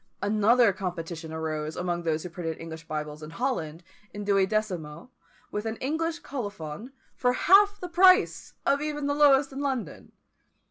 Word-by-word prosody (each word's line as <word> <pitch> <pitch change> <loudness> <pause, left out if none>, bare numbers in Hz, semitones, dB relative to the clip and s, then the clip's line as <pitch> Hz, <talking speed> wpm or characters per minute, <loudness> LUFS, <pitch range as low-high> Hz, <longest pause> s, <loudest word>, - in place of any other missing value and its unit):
Another 215 +2 +4
competition 170 -3 -5
arose 155 -1 -4
among 175 -1 -2
those 160 -2 -1
who 180 - -6
printed 165 -1 -5
English 165 0 -9
Bibles 150 0 -5
in 155 - -8
Holland, 165 - -3 0.3
in 205 0 -5
duodecimo, 195 -3 -1 0.4
with 210 +2 -3
an 220 - -2
English 320 +6 -2
colophon, 205 - -6 0.2
for 250 0 +1
half 405 +7 +5
the 360 - -5
price 370 +2 +4
even 295 +2 +1
of - - 0
the 285 - +1
lowest 285 -1 +5
in 270 - -5
London. 260 - -4
205 Hz, 150 wpm, -27 LUFS, 165-275 Hz, 0.4 s, half